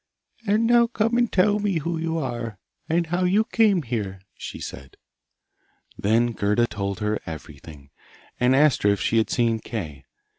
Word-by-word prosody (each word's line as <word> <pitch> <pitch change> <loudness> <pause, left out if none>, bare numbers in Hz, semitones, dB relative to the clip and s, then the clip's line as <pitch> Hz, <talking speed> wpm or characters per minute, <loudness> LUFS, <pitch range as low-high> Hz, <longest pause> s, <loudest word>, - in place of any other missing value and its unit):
'And 215 +3 +3
now 235 0 +5
come 230 0 0
and 240 -1 +2
tell 205 +2 +3
me 205 -4 0
who 165 +2 -2
you 165 0 -2
are, 120 -7 -4 0.3
and 170 +1 +2
how 175 +3 -1
you 195 +4 +3
came 210 -8 +3
here,' 105 -6 -4
she - - -8
said. 65 0 -9 1.0
Then 115 +4 +2
Gerda 105 +2 +1
told 100 -2 -4
her 105 0 0
everything, 75 -3 -10 0.5
and 125 +1 +4
asked 150 -1 +4
her 105 - +3
if 100 -1 +1
she 115 - +1
had 110 - 0
seen 115 -2 +1
Kay. 80 - -6
120 Hz, 170 wpm, -24 LUFS, -, 1.0 s, now